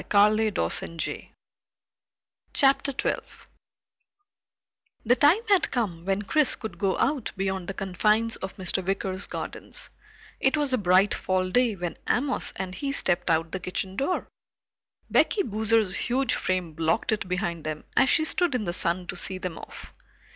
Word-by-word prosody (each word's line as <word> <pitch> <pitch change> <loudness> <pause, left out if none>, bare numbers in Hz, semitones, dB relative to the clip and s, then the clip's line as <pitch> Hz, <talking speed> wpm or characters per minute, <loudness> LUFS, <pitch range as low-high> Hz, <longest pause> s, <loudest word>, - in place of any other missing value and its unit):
CHAPTER 215 +2 +4 2.4
12 265 - -4 1.6
The 240 +3 +5
time 290 - +5
had 400 -3 +3
come 180 -9 -2
when 195 +1 0
Chris 300 +7 +4
could 220 - -8
go 195 -3 +1
out 275 -5 0
beyond 190 -2 -2
the 195 - -4
confines 210 +4 +1
of 190 - -7
Mr. 190 0 +1
Wicker's 190 0 -1
gardens. - - -6 0.5
It 270 +3 +2
was 290 -3 0
a 255 - +2
bright 190 +1 +4
fall 185 0 -1
day 245 -2 +2
when 175 -2 -5
Amos 260 +2 +1
and 185 -1 -5
he 275 +8 -3
stepped 180 -10 +1
out 165 0 +1
the 190 - -3
kitchen 185 +1 -4
door. 280 - -1 0.8
Becky 400 - +3
Boozer's 220 - +1
huge 260 +2 0
frame 185 -3 -1
blocked 165 +8 0
it 215 -3 -1
behind 175 -3 -2
them 155 0 -4
as 265 - +4
she 315 - +4
stood 345 -3 +2
in 225 -4 -1
the 175 - -2
sun 180 0 -1
to - - -6
see 190 - +1
them 185 -2 -5
off. - - -11
195 Hz, 150 wpm, -26 LUFS, 185-245 Hz, 2.4 s, The